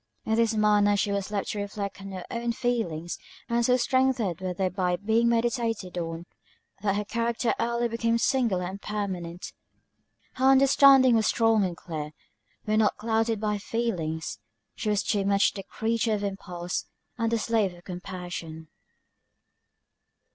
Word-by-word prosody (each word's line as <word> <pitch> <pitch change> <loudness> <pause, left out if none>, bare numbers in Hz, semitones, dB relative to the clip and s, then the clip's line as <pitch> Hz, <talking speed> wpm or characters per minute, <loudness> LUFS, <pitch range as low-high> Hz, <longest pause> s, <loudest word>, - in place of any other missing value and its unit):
In 220 - 0
this 230 0 +2
manner 210 -1 +4
was 205 - +1
she 205 - 0
left 200 0 -2
to 210 - -4
reflect 200 -1 -5
on 195 0 -8
her 185 -1 -6
own 235 0 -1
feelings; 215 -10 -2 0.3
and 235 0 +1
so 250 +1 +4
strengthened 255 - +1
were 185 -1 -2
they 185 +1 0
by 180 -1 0
being 220 +5 +2
meditated 230 -5 0
on, 165 -1 -4 0.6
that 200 -1 +1
her 210 0 -1
character 235 +1 0
early 235 0 0
became 230 0 0
singular 230 -7 +1
and 190 +3 -6
permanent. 185 -5 -4 0.8
Her 260 - +1
understanding 270 -1 +7
was 220 -1 +3
strong 225 -2 +3
and 175 -3 -2
clear, 155 -3 -6 0.5
when 215 0 +2
not 215 - +2
clouded 225 0 0
by 210 0 0
her 205 - -2
feelings; 180 -8 -3 0.3
but - - -13
she 215 - 0
was 210 -1 +1
too 205 -2 0
much 200 0 +3
the 195 - -5
creature 225 +3 -1
of 205 - -4
impulse, 180 -3 -4 0.3
and 230 0 +1
the 230 - +2
slave 220 -3 +1
of 175 - -16
compassion. 175 -3 -7
210 Hz, 160 wpm, -27 LUFS, 185-230 Hz, 0.8 s, understanding